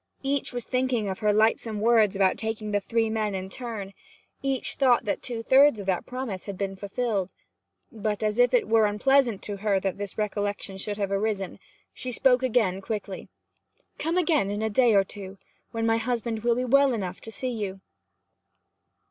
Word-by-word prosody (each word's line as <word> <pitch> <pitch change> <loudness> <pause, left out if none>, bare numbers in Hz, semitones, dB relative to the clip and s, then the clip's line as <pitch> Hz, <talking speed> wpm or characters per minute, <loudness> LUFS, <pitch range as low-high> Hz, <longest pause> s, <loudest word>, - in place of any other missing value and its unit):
Each 275 0 -1
was 245 -2 -4
thinking 255 -4 0
of 190 -1 -4
her 210 -1 +2
lightsome 220 0 +2
words 220 -2 +4
about 195 -1 +2
taking 220 -1 -3
the 205 - +2
three 225 +3 0
men 215 -2 -1
in 190 0 -5
turn; 220 -5 -6 0.5
each 270 -1 -1
thought 255 -3 +3
that 205 - -1
two 235 -2 -3
thirds 270 -1 +5
of 200 - -6
that 190 -2 -1
promise 250 -8 -5
had 200 -2 -5
been 195 0 -3
fulfilled. 200 -1 -2 0.6
But, 215 -2 -3
as 215 +2 0
if 245 0 +5
it 245 -2 +2
were 220 -1 +4
unpleasant 240 +1 +2
to 205 -1 -4
her 200 -1 +1
that 195 0 -2
this 205 -1 -5
recollection 205 -2 -2
should 205 +1 -4
have 200 -2 -2
arisen, 200 -2 -1 0.3
she 255 - -5
spoke 250 +1 +3
again 220 -7 +1
quickly: 200 -2 -5 0.7
'Come 330 +3 -1
again 315 - +2
in 205 +2 -2
a 220 - 0
day 235 0 +4
or 195 - +6
two, 195 0 -9 0.3
when 225 0 -2
my 225 0 +3
husband 230 -1 -2
will 235 +1 +2
be 250 +1 -1
well 275 +1 +4
enough 190 -4 -4
to 225 - -9
see 255 +2 -3
you.' 200 -4 -4
220 Hz, 190 wpm, -26 LUFS, 200-245 Hz, 0.7 s, or